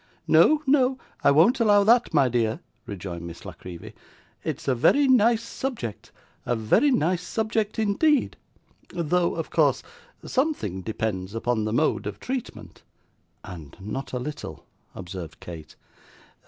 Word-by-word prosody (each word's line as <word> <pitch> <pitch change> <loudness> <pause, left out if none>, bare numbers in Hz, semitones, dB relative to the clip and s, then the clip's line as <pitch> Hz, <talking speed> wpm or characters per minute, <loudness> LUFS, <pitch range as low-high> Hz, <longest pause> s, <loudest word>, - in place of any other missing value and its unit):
'No, 310 0 +5
no, 265 -2 +3 0.3
I - - +6
won't 170 - +5
allow 205 -3 +5
that, 235 +3 +4
my 140 -4 +4
dear,' 115 -2 0 0.3
rejoined 90 -4 -6
Miss 85 0 -10
La - - -7
Creevy. 85 -2 -10 0.5
'It's - - -4
a 135 - +3
very 275 - +4
nice 235 -2 +4
subject 235 - -5 0.3
a 120 - 0
very 115 - +3
nice 180 - +1
subject, 220 +2 -2
indeed 225 +8 +2 0.5
though, 170 +1 0
of - - -5
course, - - +2 0.4
something 260 - -1
depends 100 -1 -3
upon 115 -1 -1
the 110 - -2
mode 155 +6 +1
of - - -6
treatment.' 255 -2 -6 0.6
'And 85 -7 -10
not 110 +8 -5
a 125 - -2
little,' 145 +4 -7 0.3
observed 90 -3 -8
Kate. 80 -3 -10
150 Hz, 140 wpm, -25 LUFS, -, 0.6 s, I